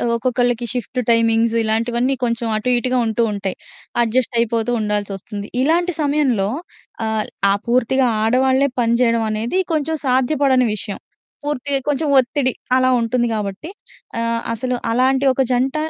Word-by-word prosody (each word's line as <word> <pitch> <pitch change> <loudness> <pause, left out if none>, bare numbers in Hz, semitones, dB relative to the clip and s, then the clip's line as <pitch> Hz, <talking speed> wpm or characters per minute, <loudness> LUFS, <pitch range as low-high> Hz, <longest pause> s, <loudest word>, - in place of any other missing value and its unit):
ఒక్కొక్కళ్ళకి 245 0 0
shift 250 0 -3
timings 230 0 +2
ఇలాంటివన్నీ 235 +4 0
కొంచెం 235 0 -1
అటు 250 +4 -1
ఇటుగా 255 +1 0
ఉంటూ 225 +1 +1
ఉంటాయి. 195 -2 -4 0.5
అడ్జస్ట్ 240 +1 0
అయిపోతూ 230 +1 0
ఉండాల్సొస్తుంది. 205 0 -4
ఇలాంటి 345 +4 +2
సమయంలో 280 -9 +1 0.6
ఆహ్, 220 -1 -1 0.3
ఆ - - +4
పూర్తిగా 255 +2 +2 0.2
ఆడవాళ్ళే 260 +4 +3
పని 230 0 +2
చేయడం 230 -2 +2
అనేది 230 - -1
కొంచెం 315 +1 -1
సాధ్యపడని 260 0 +2
విషయం. 205 -1 -6 0.5
పూర్తిగా 285 -1 -1
కొంచెం 295 +2 0
ఒత్తిడి 260 +1 0 0.2
అలా 255 0 +3
ఉంటుంది 240 +1 0
గాబట్టి, 210 - -4 0.5
ఆహ్, 230 0 0
అసలు 250 +2 -2 0.2
అలాంటి 260 +3 +2
ఒక 265 - 0
జంట 255 +3 +1
245 Hz, 130 wpm, -19 LUFS, 225-265 Hz, 0.6 s, ఆ